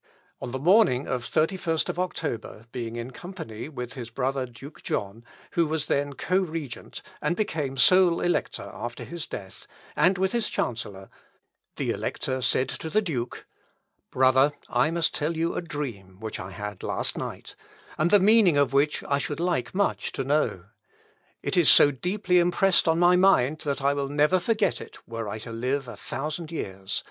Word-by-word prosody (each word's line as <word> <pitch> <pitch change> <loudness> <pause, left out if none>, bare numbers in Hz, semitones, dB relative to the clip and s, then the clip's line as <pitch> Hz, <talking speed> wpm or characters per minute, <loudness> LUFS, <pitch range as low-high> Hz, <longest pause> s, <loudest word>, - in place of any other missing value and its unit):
On - - -4
the 130 - -3
morning 155 - +4
of 125 -1 -3
the - - +4
31st 165 -4 -2
October, 155 -11 -4
being 115 -2 -5
in 120 +2 -5
company 155 - -8
with 125 -5 -6
his 120 -3 -7
brother 130 +2 -1
Duke 135 +5 -12
John, 100 +3 -3 0.3
who 170 -2 +2
was 155 -1 -1
then 140 0 0
co 185 +7 +1
regent, 160 -8 -5 0.2
and 150 +4 0
became 150 -10 -2
sole 180 +4 +5
elector 175 - -1
after 120 +1 -6
his 170 -2 -6
death, 95 -2 -8 0.3
and 185 +1 +3
with 190 +1 +1
his 235 -2 +1
chancellor, 100 -5 -4 0.6
the - - -1
Elector 130 -1 -2
said 130 +1 +2
to 160 - -5
the 215 +5 +2
Duke, 130 -10 -4 0.6
"Brother, 130 +2 +4 0.2
I 125 +5 +2
must 165 -1 0
tell 160 +2 -1
you 165 +1 0
a - - -2
dream 120 - -6
which 110 0 -5
I 95 - -6
had 100 +1 -7
last - - -1
night, - - -6 0.4
and 155 +3 +1
the 205 - +6
meaning 200 -5 +6
of 140 -1 +2
which 145 +2 +2
I 140 0 0
should 135 +3 -3
like 170 -6 -1
much 200 +1 0
to 135 - -2
know. 135 - 0 0.8
It - - -1
is 175 -4 +5
so 145 - +8
deeply 180 +6 +1
impressed 175 +1 +3
on 160 0 +3
my 175 +1 +5
mind, 155 -6 +4
that 140 -3 -3
I 140 +1 +3
will 140 -1 -2
never 150 +6 +3
forget 215 +3 0
it, - - -11
were 115 -2 -4
I 105 - -4
to 115 +2 -8
live 130 +4 -2
a 120 - -7
thousand 150 - -5
years. 95 - -4
145 Hz, 180 wpm, -26 LUFS, 120-175 Hz, 0.8 s, so